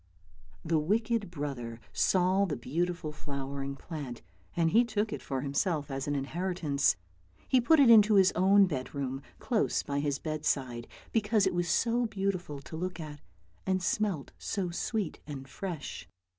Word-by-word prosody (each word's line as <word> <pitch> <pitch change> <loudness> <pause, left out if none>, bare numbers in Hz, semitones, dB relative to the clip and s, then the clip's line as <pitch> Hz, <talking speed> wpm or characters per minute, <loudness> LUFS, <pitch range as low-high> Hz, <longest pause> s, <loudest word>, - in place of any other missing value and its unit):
The 160 -1 +2
wicked 215 +5 0
brother 135 -8 -5
saw 185 +1 +3
the 160 -6 -2
beautiful 165 +5 -2
flowering 140 -1 -5
plant, 140 -5 -7 0.3
and 165 -1 +2
he 235 +6 +6
took 220 -2 -1
it - - -5
for 135 -2 -3
himself 145 +1 -1
as 135 +1 -3
an 145 - 0
inheritance. 155 - 0 0.5
He 255 - +4
put 315 +6 +5
it 275 - +7
into 215 -1 +7
his 195 -1 +6
own 195 +2 +5
bedroom, 135 -3 -3 0.2
close 230 -4 0
by 140 0 -2
his 145 -1 0
bedside, 140 -7 -2 0.2
because 215 -2 +2
it 190 - +1
was 175 0 0
so 235 0 +2
beautiful 190 -8 -2
to 150 - -9
look 180 +1 -4
at, 150 -2 -7 0.5
and 185 -1 +1
smelt 205 -7 0
so 185 -4 -2
sweet 205 +1 -2
and 135 -3 -7
fresh. 170 +1 -6
170 Hz, 155 wpm, -30 LUFS, 140-200 Hz, 0.5 s, it